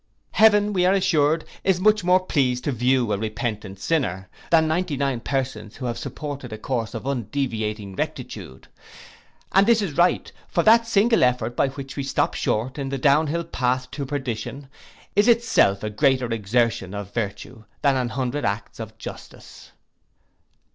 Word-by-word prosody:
Heaven, 210 -1 +4
we 180 -2 +2
are 190 - +4
assured, 160 -5 +2 0.2
is 190 -2 +2
much 210 +1 +3
more 180 +1 +4
pleased 125 -6 +1
to 145 - 0
view 125 -2 +1
a 100 - -1
repentant 110 -2 -4
sinner, 95 - -1 0.2
than 160 -1 +4
ninety 160 -2 -1
nine 135 -3 0
persons 130 -4 -3
who 130 - -6
have 120 -1 -3
supported 140 -5 -6
a 110 - -5
course 115 -1 -3
of - - -6
undeviating 110 -6 -3
rectitude. 65 -6 -6 0.8
And 195 +2 +4
this 235 -1 +5
is 180 -9 -3
right; 175 +1 +2 0.2
for 170 - 0
that 230 +1 +5
single 225 +1 +3
effort 120 -2 +1
by 140 - +2
which 135 +1 -8
we - - -1
stop 135 - 0
short 125 +6 -1
in 135 -1 -3
the 135 - -2
downhill 150 +5 +2
path 130 -4 -1
to 140 -1 -5
perdition, 135 0 -4 0.5
is 205 +3 +4
itself 230 - +3
a 105 - -3
greater 130 +3 +2
exertion 110 -2 0
of 100 -1 -7
virtue, 110 +1 -5 0.2
than 140 -2 +4
an 125 -2 0
hundred 130 +4 -2
acts 105 +4 -3
of 110 -1 -8
justice. - - -11
135 Hz, 165 wpm, -23 LUFS, 115-160 Hz, 0.8 s, this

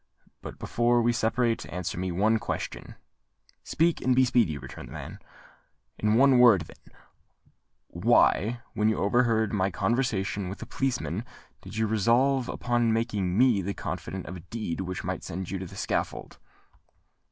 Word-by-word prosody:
"But, - - -8
before 120 +1 +1
we 120 +1 +2
separate, 115 0 0
answer 90 -1 -4
me 90 +1 -3
one 105 +6 +2
question." - - -5 0.7
"Speak—and 160 -6 +1
be 130 0 +5
speedy," 115 - +2
returned 65 -1 -9
the - - -13
man. - - -8 0.8
"In 105 0 +2
one 130 +1 +5
word, 115 -7 +7
then, 80 - -14 0.9
why, 115 +3 +2
when 105 0 +2
you 110 - 0
overheard 110 0 +2
my 95 -2 +1
conversation 100 -2 -1
with 95 - -6
the - - -8
policeman, 115 - -2 0.4
did 110 - -9
you 110 - +2
resolve 120 +5 +2
upon 120 -1 0
making 105 -5 -1
me 120 -5 +4
the 100 +2 -4
confidant 95 -1 -5
of 90 - -7
a 85 +1 -14
deed 105 -6 -4
which 95 -1 -5
might - - -4
send 95 +2 -5
you 95 - -3
to 95 - -6
the - - -12
scaffold?" - - -3
110 Hz, 155 wpm, -27 LUFS, 95-120 Hz, 0.9 s, word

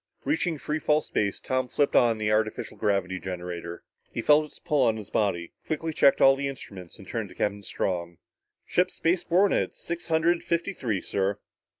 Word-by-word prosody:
Reaching 175 - 0
free 150 +2 -2
fall 150 0 +2
space, 100 -2 -1
Tom 130 0 -1
flipped 145 +3 0
on 115 -2 +5
the 105 0 0
artificial 110 0 0
gravity 95 -2 0
generator. 90 -2 -6 0.3
He 115 - -4
felt 150 +1 +5
its 150 - -14
pull 150 -6 +1
on 110 -2 +2
his 105 -3 -9
body, 85 -5 0
quickly 160 0 -2
checked 140 -2 +4
all 135 0 +7
the 140 +1 -2
instruments 100 -10 -8
and - - -13
turned - - -3
to - - -14
Captain 100 0 -1
Strong. 85 -4 -3 0.5
"Ship 180 +1 +2
space 175 +1 0
borne 190 +4 +3
at - - 0
six 170 0 -6
hundred 165 +1 +2
fifty 170 +4 -1
three, 110 - -2
sir." 100 +1 -1
125 Hz, 190 wpm, -27 LUFS, 100-160 Hz, 0.5 s, all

